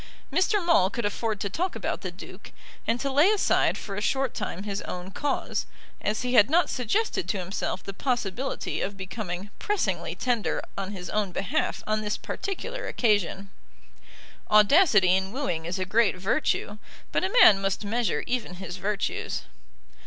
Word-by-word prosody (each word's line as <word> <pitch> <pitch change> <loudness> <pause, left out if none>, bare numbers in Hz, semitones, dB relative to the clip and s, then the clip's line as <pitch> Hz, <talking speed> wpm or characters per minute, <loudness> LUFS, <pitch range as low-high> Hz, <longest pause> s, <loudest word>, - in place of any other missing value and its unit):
Mr. 375 +3 +2
Maule 195 - +5
could 235 +2 -3
afford 210 0 -1
to - - -1
talk 350 - -2
about - - -3
the - - -4
Duke, - - -11 0.4
and 230 +2 +1
to 275 +2 -1
lay 295 +8 +5
aside 425 -2 +2
for 200 - -6
a 205 - -3
short 265 +2 0
time 190 - -4
his 200 -1 -3
own 180 +1 -6
cause, 290 +7 -2 0.3
as 215 +3 -1
he 250 0 -1
had 210 -1 +6
not 340 +4 +3
suggested 380 - 0
to 205 - 0
himself 185 +1 -3
the 195 - -6
possibility 245 +2 -2
of 200 0 -3
becoming 190 0 -5
pressingly 415 -1 -1
tender 245 -4 0 0.2
on 195 -1 -4
his 180 -3 -6
own 210 -3 0
behalf 295 - -1
on 215 0 0
this 210 0 -2
particular 480 +6 -5
occasion. 200 -3 0 1.0
Audacity 210 - +6
in 190 0 -1
wooing 195 - -2
is 180 +3 -2
a 185 - -1
great 220 +3 +3
virtue, 205 +1 -1 0.3
but - - +1
a 375 - 0
man 195 -2 +8
must 195 +1 -1
measure 225 -1 0
even 240 -7 -2
his 185 0 -6
virtues. 200 +2 -2
210 Hz, 165 wpm, -27 LUFS, 195-270 Hz, 1.0 s, man